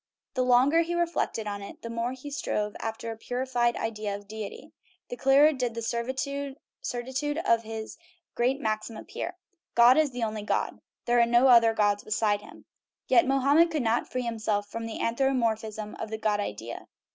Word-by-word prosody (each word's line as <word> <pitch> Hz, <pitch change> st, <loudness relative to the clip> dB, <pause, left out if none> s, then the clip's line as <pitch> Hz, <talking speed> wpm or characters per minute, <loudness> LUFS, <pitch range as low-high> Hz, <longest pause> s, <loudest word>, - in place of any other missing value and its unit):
The 255 Hz, -, 0 dB
longer 255 Hz, +6 st, +5 dB
he 340 Hz, +1 st, -2 dB
re 345 Hz, 0 st, +3 dB
flected 280 Hz, -9 st, -2 dB
on 205 Hz, -1 st, -4 dB
it, 200 Hz, -, -8 dB
and -, -, -38 dB
the 230 Hz, -, -5 dB
more 230 Hz, +2 st, -2 dB
he 260 Hz, +3 st, -9 dB
strove 210 Hz, -7 st, -2 dB
after 225 Hz, +1 st, -4 dB
a -, -, -5 dB
purified 245 Hz, 0 st, -1 dB
idea 215 Hz, -2 st, -3 dB
of 205 Hz, 0 st, -10 dB
deity, 215 Hz, -1 st, -7 dB, 0.4 s
the -, -, -4 dB
clearer 275 Hz, +4 st, +5 dB
did 250 Hz, -4 st, -2 dB
the 230 Hz, -, -4 dB, 1.0 s
certitude 260 Hz, +5 st, -3 dB
of 230 Hz, 0 st, +4 dB
his 220 Hz, +3 st, -7 dB, 0.3 s
great 255 Hz, +3 st, +1 dB
maxim 215 Hz, -2 st, -2 dB
appear: 355 Hz, +9 st, -6 dB, 0.4 s
"God 240 Hz, +3 st, +7 dB
is 310 Hz, -2 st, +3 dB
the 245 Hz, -2 st, -4 dB
only 215 Hz, -1 st, -2 dB
God 205 Hz, -, -1 dB
" -, -, -64 dB
there 240 Hz, 0 st, +3 dB
are 235 Hz, -, +5 dB
no 240 Hz, +3 st, +5 dB
other 230 Hz, -2 st, +6 dB
gods 205 Hz, -1 st, +2 dB
beside 210 Hz, -1 st, +1 dB
him. -, -, -14 dB, 0.4 s
Yet 345 Hz, -, +5 dB
Mohammed 280 Hz, +5 st, +4 dB
could 310 Hz, -5 st, -1 dB
not 230 Hz, +1 st, 0 dB
free 255 Hz, 0 st, -2 dB
himself 215 Hz, -3 st, -1 dB
from 230 Hz, +2 st, -5 dB
the 225 Hz, -, -6 dB
an 230 Hz, -, 0 dB
thropomorphism 220 Hz, -5 st, 0 dB
of 220 Hz, -, -4 dB
the 220 Hz, -, -4 dB
God 215 Hz, -1 st, 0 dB
idea. 115 Hz, -, -5 dB
230 Hz, 195 wpm, -28 LUFS, 215-260 Hz, 1.0 s, God